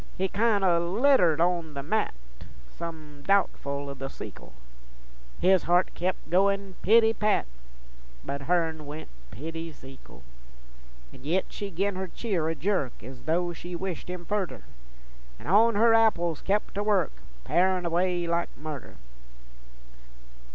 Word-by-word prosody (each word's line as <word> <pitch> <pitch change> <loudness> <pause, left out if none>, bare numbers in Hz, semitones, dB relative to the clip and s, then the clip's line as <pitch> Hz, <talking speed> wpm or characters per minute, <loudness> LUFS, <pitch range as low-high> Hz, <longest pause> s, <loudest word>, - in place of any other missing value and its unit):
He 190 +1 +1
kin' 215 -1 +2
o' 175 -3 +4
l'itered 215 - +4
on 170 -3 +1
the 140 - -4
mat, 195 - 0 0.6
Some 155 -3 -8
doubtfle 140 -8 +1
o' 140 - -4
the 135 0 -6
sekle, - - -10 0.9
His 185 0 +5
heart 175 +1 +2
kep' 180 +2 -1
goin' 195 +1 +2
pity 225 +2 +5
pat, 210 -1 +1 0.8
But 140 0 -4
hern 160 -1 0
went 150 +2 -7 0.2
pity 165 - -6
Zekle. 135 - -14 0.9
An' 130 - -14
yit 175 +6 +1
she 205 - -4
gin 195 +2 -1
her 190 0 -3
cheer 180 -6 -2
a 165 - -1
jerk 155 - -1
Ez 130 +1 -10
though 175 +2 +1
she 175 +1 -7
wished 180 -1 -5
him 180 -1 -6
furder, 200 - -2 0.7
An' - - -14
on 215 +6 +5
her 225 +2 +5
apples 175 -8 +3
kep' 205 +2 0
to 200 - -2
work, 205 - +2 0.3
Parin' 185 0 +2
away 175 +1 +1
like 170 0 0
murder. 150 -3 -7
175 Hz, 140 wpm, -27 LUFS, 155-195 Hz, 0.9 s, His